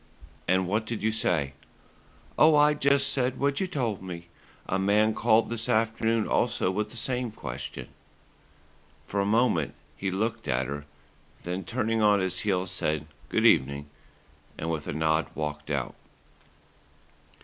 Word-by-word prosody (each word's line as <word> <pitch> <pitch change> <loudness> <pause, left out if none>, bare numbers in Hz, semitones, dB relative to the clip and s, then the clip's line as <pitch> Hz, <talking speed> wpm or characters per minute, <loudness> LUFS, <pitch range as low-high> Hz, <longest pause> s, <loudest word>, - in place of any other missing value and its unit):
"And 95 0 +2
what 110 +4 0
did 115 -3 -4
you 110 - +2
say?" 80 -10 0 0.8
"Oh, 155 0 +6
I 150 0 +6
just 140 -1 +3
said 130 -1 0
what 140 0 +1
you 190 - 0
told 120 - -2
me. 85 -2 -8 0.4
A 95 - 0
man 105 +3 +3
called 115 +1 +3
this 115 -1 -2
afternoon 115 0 +1
also 90 - +1
with 105 +2 -2
the 120 - -12
same 125 0 -1
question." - - -6 1.2
For 100 - -2
a 100 - +1
moment 110 - +2 0.2
he 95 +6 -2
looked 110 +4 -2
at 65 0 +1
her, 70 +1 -5 0.6
then 90 +2 -3
turning 115 0 0
on 105 -1 +5
his 95 -1 -1
heel 95 -2 0
said 80 -5 -1 0.2
"good - - +1
evening," 70 +1 +3 0.7
and 80 +1 -2
with 75 -2 -3
a - - -2
nod 80 +1 +1
walked 75 -1 -4
out. 70 -4 -2
105 Hz, 150 wpm, -27 LUFS, 85-115 Hz, 1.2 s, Oh